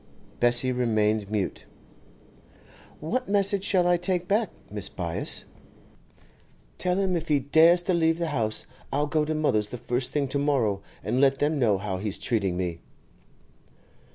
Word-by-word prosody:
Bessie 120 +1 +3
remained 110 -4 +1
mute. 105 -3 -3 1.3
'What 250 +11 -3
message 200 -1 +2
shall 185 -3 +2
I 175 0 +4
take 180 0 -1
back, 210 +4 +1 0.2
Mrs. - - -3
Byass?' - - -2 1.3
'Tell 180 0 0
him 190 -2 +1
if 165 -1 -3
he 150 -2 +3
dares 160 +6 +5
to 185 - 0
leave 165 -1 +2
the 170 -1 -2
house, 110 -7 -2 0.3
I'll 145 +2 +1
go 150 +1 0
to 155 +1 -2
mother's 110 -9 +1
the 125 - -6
first 125 +2 -2
thing 145 -2 0
to 140 +1 -1
morrow, 125 -9 +1 0.2
and 125 - 0
let 135 -1 +4
them 145 +1 0
know 110 -6 +3
how 95 -1 -3
he's 105 0 -3
treating 100 -6 -1
me. 90 -2 -3
140 Hz, 155 wpm, -26 LUFS, 110-170 Hz, 1.3 s, dares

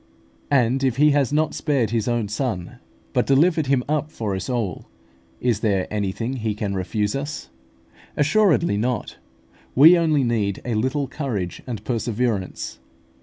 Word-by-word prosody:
And 130 -1 +2
if 130 -2 +1
He 150 +1 +5
has 140 -2 +2
not 155 +1 +1
spared 135 -8 0
His 115 -1 0
own 120 -3 0
Son, 105 -5 -3 0.3
but - - +1
delivered 155 +2 +3
Him 135 -2 +2
up 150 0 -1
for 105 -4 -3
us 95 0 -5
all, 115 -9 -3 0.5
is 120 -4 +1
there 100 -4 +1
anything 105 +5 -2
He 110 -3 -2
can 105 -2 -3
refuse 105 +3 -1
us? 145 +2 -5 0.7
Assuredly 170 - +3
not. 120 +3 -2 0.6
We 160 +7 +9
only 155 -4 +2
need 105 -5 0
a 120 - -1
little 130 +6 0
courage 120 - -4
and 110 -4 -5
perseverance. 115 -4 -2
120 Hz, 150 wpm, -22 LUFS, 105-140 Hz, 0.7 s, We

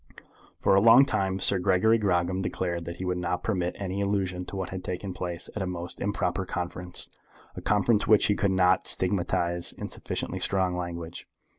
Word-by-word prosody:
For - - +3
a 95 - +5
long 115 +5 +7
time 95 -7 -1
Sir 95 0 +6
Gregory 95 +5 +3
Grogram 90 -2 0
declared 90 -2 -3
that 85 0 -6
he 95 - -6
would 90 0 -1
not 90 0 -2
permit 90 -4 -1
any 100 0 -3
allusion 95 -3 -1
to - - -8
what 95 -1 -3
had 95 -1 -6
taken 90 +1 -5
place 90 -1 -3
at 105 - -3
a 95 - -2
most 90 -1 -5
improper 100 -2 -1
conference, 90 -1 -3 0.5
a - - -7
conference 105 +1 +2
which 110 -2 +5
he 105 - +3
could 100 -1 0
not 95 -1 +2
stigmatize 85 -2 0
in - - -7
sufficiently - - -4
strong 95 -2 0
language. 85 -1 -6
95 Hz, 185 wpm, -27 LUFS, 90-100 Hz, 0.5 s, long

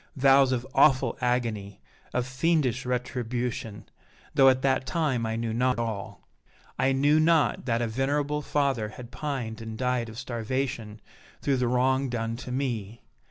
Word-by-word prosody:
vows 135 -1 +5
of 125 -1 -1
awful 135 -4 +4
agony, 115 -5 -1 0.3
of 125 - -1
fiendish 130 -1 0
retribution, 125 -3 -3 0.5
though 135 -1 +7
at 130 0 +1
that 130 -1 +1
time 130 -7 0
I 110 - -2
knew 115 -1 -2
not 125 +2 +1
all! 110 -4 -5 0.5
I 135 - +3
knew 145 +3 +3
not 155 -7 +2
that 115 0 +1
a - - 0
venerable 145 +5 -1
father 135 -7 0
had 120 +2 -11
pined 130 -8 -4
and 110 -1 -6
died 125 -1 -1
of 110 - -10
starvation 120 -3 -3 0.4
through 140 -2 +2
the 125 -1 +1
wrong 130 +2 +2
done 115 -1 -2
to 125 - -7
me! 120 -5 -3
125 Hz, 155 wpm, -27 LUFS, 115-135 Hz, 0.5 s, though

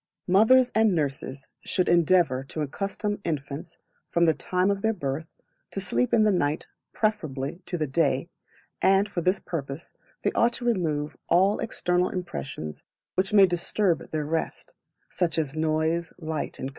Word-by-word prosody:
Mothers 230 +7 +5
and 220 -3 +4
Nurses 135 -2 -3 0.2
should 185 - 0
endeavour 170 -6 +3
to 155 +2 -3
accustom 200 +7 -3
infants, 150 +1 -4 0.3
from 170 0 +3
the 160 - +4
time 180 +4 0
of 200 0 -2
their 220 +1 +1
birth, 155 -2 -3 0.4
to - - -4
sleep 125 -10 0
in 220 - +5
the 215 - +4
night 150 -5 0 0.2
preferably 165 -7 -2
to 175 - -2
the 155 - 0
day, 140 0 +1 0.5
and 195 +1 +4
for 190 -4 -3
this 185 +3 +2
purpose 140 -2 -6 0.3
they - - +2
ought 235 +1 +2
to 240 - -5
remove 155 -10 0
all 195 +4 +4
external 180 -5 0
impressions 135 - -5 0.3
which 190 +1 0
may 200 -2 +8
disturb 175 0 0
their 155 -1 -2
rest, 160 +2 -3 0.4
such 170 -3 -1
as 155 -3 -1
noise, 160 +2 0
light, 160 -2 -3
&c. 130 - -4
170 Hz, 155 wpm, -26 LUFS, 150-195 Hz, 0.5 s, may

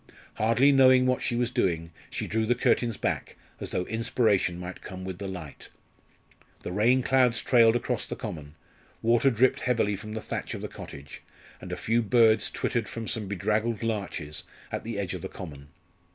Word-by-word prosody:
Hardly 115 +6 +4
knowing 130 -2 +6
what 130 0 +1
she 120 - -1
was 120 0 0
doing, 85 -6 0 0.2
she - - -3
drew 110 0 -1
the 120 - +3
curtains 120 -2 +1
back, - - -2 0.2
as - - -4
though 90 - -1
inspiration 110 -5 +1
might 90 0 -7
come 95 0 -8
with 95 -1 -6
the 100 - -4
light. 90 -6 -8 0.9
The - - -4
rain 120 +7 +3
clouds 125 -3 +3
trailed 115 -2 +5
across 120 - -1
the - - -5
common; 75 -1 -7 0.5
water 120 +3 +4
dripped 125 +1 +3
heavily 115 -5 +1
from 110 +2 -8
the 110 - -3
thatch - - -4
of - - -7
the - - -2
cottage; 70 +1 -10 0.4
and - - -8
a - - -3
few 115 +2 +1
birds 115 0 +4
twittered 115 -4 -2
from 115 -1 -6
some 110 -3 -2
bedraggled 105 +3 -1
larches 95 -9 -3 0.3
at - - -3
the 115 -2 -5
edge 95 -3 -2
of 90 - -5
the 95 - -5
common. 75 -6 -9
110 Hz, 185 wpm, -27 LUFS, 95-120 Hz, 0.9 s, knowing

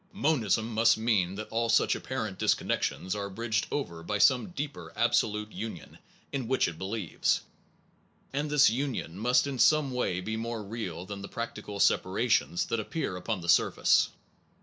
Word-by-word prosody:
Monism 115 - +1
must 115 +1 +4
mean 105 -5 +1
that 110 +1 -6
all 115 +1 0
such 115 - +4
apparent - - -4
disconnections 95 - 0
are 100 -1 -3
bridged 110 +1 -1
over 85 - -3
by 105 +5 -2
some 125 - +4
deeper 145 -4 -6
absolute 105 0 +1
union 110 -8 -7 0.3
in 135 -4 -3
which 130 +1 +2
it 85 -2 -6
believes, 95 -2 -1 0.9
and 145 +2 -1
this 145 -1 +6
union 120 -8 -2
must 125 +6 +3
in 135 -3 -4
some 155 -1 +4
way 125 -8 -1
be 110 +4 -3
more 115 0 -4
real 100 -5 -5
than 100 +1 -7
the 100 - -7
practical 110 -3 -6
separations 95 -3 +2
that 115 - -1
appear 110 - -3
upon 95 +2 -3
the 85 - -7
surface. - - +4
110 Hz, 160 wpm, -29 LUFS, 100-125 Hz, 0.9 s, this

